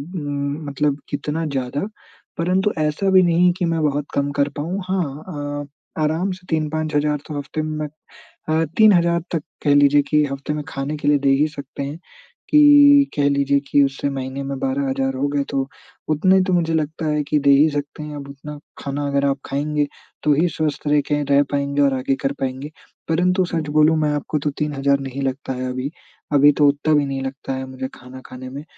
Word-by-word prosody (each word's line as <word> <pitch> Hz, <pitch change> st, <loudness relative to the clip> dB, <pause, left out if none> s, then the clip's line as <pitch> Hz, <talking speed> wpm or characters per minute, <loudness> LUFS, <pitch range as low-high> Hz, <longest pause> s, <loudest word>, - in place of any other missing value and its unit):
म 145 Hz, -1 st, -3 dB
मतलब 140 Hz, 0 st, 0 dB
कितना 150 Hz, +3 st, -2 dB
ज़्यादा? 140 Hz, +2 st, -2 dB, 0.5 s
परंतु 185 Hz, +4 st, +1 dB
ऐसा 155 Hz, +6 st, 0 dB
भी 190 Hz, -1 st, +7 dB
नहीं 175 Hz, +1 st, +4 dB
कि 180 Hz, -, 0 dB
मैं 165 Hz, -1 st, 0 dB
बहुत 145 Hz, -1 st, 0 dB
कम 140 Hz, 0 st, 0 dB
कर 140 Hz, -, +2 dB
पाऊँ। 175 Hz, +6 st, -2 dB
हाँ 155 Hz, -6 st, -2 dB, 0.4 s
अ, 145 Hz, +2 st, -11 dB
आराम 165 Hz, +5 st, 0 dB
से 185 Hz, 0 st, -9 dB
3-5,000 155 Hz, -1 st, 0 dB
तो 150 Hz, -2 st, -5 dB
हफ़्ते 145 Hz, +2 st, -4 dB
में। 155 Hz, 0 st, -3 dB, 0.7 s
मैं 160 Hz, +1 st, +2 dB
3,000 170 Hz, -6 st, +5 dB
तक 165 Hz, -, -1 dB, 0.2 s
कह 145 Hz, -1 st, +4 dB
लीजिए 145 Hz, 0 st, +5 dB
कि 150 Hz, -1 st, +3 dB
हफ़्ते 140 Hz, +2 st, -4 dB
में 150 Hz, 0 st, -4 dB
खाने 140 Hz, +2 st, -4 dB
के 145 Hz, -, -4 dB
लिए 145 Hz, -1 st, +4 dB
दे 140 Hz, 0 st, +1 dB
ही 140 Hz, +3 st, +3 dB
सकते 140 Hz, -2 st, -7 dB
हैं 145 Hz, +4 st, -6 dB, 0.5 s
कि 290 Hz, -1 st, +7 dB
कह 145 Hz, -1 st, +2 dB
लीजिए 140 Hz, 0 st, +2 dB
की 145 Hz, -, +5 dB
उससे 135 Hz, +1 st, -2 dB
महीने 135 Hz, 0 st, -4 dB
में 135 Hz, 0 st, -4 dB
12,000 135 Hz, 0 st, -1 dB
हो 135 Hz, +2 st, 0 dB
गए। 140 Hz, 0 st, 0 dB
तो 135 Hz, -1 st, -1 dB, 0.4 s
उतने 185 Hz, +5 st, +4 dB
तो 185 Hz, -, +1 dB
मुझे 165 Hz, -2 st, +1 dB
लगता 160 Hz, +1 st, -2 dB
है 150 Hz, -1 st, 0 dB
कि 150 Hz, -, +3 dB
दे 140 Hz, -, +2 dB
ही 145 Hz, +3 st, +6 dB
सकते 145 Hz, +1 st, -4 dB
हैं 150 Hz, 0 st, -7 dB
अब 140 Hz, -1 st, -8 dB
उतना 145 Hz, +2 st, -9 dB, 0.2 s
खाना 145 Hz, +1 st, -3 dB
अगर 140 Hz, 0 st, +1 dB
आप 140 Hz, 0 st, +1 dB
खाएँगे 145 Hz, +1 st, -1 dB, 0.4 s
तो 150 Hz, -, +4 dB
ही 160 Hz, +5 st, +2 dB
स्वस्थ 150 Hz, -2 st, -3 dB
रह 150 Hz, 0 st, +4 dB
के 150 Hz, 0 st, +1 dB
रह 140 Hz, -, +6 dB
पाएँगे 140 Hz, 0 st, 0 dB
और 140 Hz, -1 st, +3 dB
आगे 135 Hz, +1 st, 0 dB
कर 135 Hz, -, 0 dB
पाएँगे। 135 Hz, +3 st, -3 dB, 0.4 s
परंतु 180 Hz, +3 st, +2 dB
सच 165 Hz, -3 st, -3 dB
बोलूँ 155 Hz, +2 st, +4 dB
मैं 150 Hz, -1 st, +1 dB
आपको 150 Hz, +1 st, -2 dB
तो 145 Hz, +1 st, -1 dB
3,000 140 Hz, -2 st, +1 dB
नहीं 135 Hz, 0 st, -5 dB
लगता 135 Hz, 0 st, -3 dB
है 130 Hz, 0 st, -3 dB
अभी। 130 Hz, +3 st, -3 dB, 0.4 s
अभी 145 Hz, +1 st, +7 dB
तो 145 Hz, 0 st, +4 dB
उतना 145 Hz, +2 st, +1 dB
भी 145 Hz, -1 st, +3 dB
नहीं 135 Hz, -1 st, -3 dB
लगता 135 Hz, 0 st, -5 dB
है 130 Hz, -, -4 dB
मुझे 130 Hz, 0 st, -5 dB
खाना 130 Hz, +1 st, -12 dB
खाने 130 Hz, 0 st, -9 dB
में 140 Hz, +3 st, -7 dB
145 Hz, 200 wpm, -21 LUFS, 140-155 Hz, 0.7 s, भी